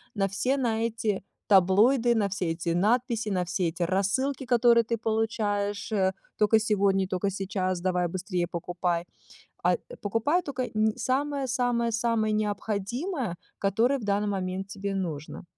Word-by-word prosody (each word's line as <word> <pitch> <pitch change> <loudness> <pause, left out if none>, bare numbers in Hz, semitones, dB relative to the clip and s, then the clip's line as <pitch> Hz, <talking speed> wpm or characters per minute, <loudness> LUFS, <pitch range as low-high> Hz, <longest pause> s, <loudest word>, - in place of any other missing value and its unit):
на 195 -1 +1
все 255 +8 0
на 230 -4 0
эти 220 -4 -2 0.2
таблоиды, 220 +6 +5
на 205 -2 +1
все 185 -3 -1
эти 165 +1 -3
надписи, 225 +5 +1
на 185 -3 0
все 175 +1 0
эти 165 +2 -2
рассылки, 200 +10 0
которые 240 -1 +5
ты 230 +1 -1
получаешь, 215 -2 -1
э, 190 -3 +2 0.2
"только 215 +1 +4
сегодня, 200 -3 +2
только 190 +1 -1
сейчас, 185 -2 -2
давай 180 -1 +1
быстрее 180 0 -2
покупай". 175 0 -2 0.6
А, - - +4 0.3
покупая 225 - +1
только 265 -3 -3
н 215 0 +2
самое-самое-самое 245 -4 0
необходимое, 215 - -2 0.2
которое 230 +7 +2
в - - -9
данный 205 0 0
момент 190 -1 -2
тебе 200 0 -4
нужно. 160 -6 -4
205 Hz, 140 wpm, -27 LUFS, 190-235 Hz, 0.6 s, таблоиды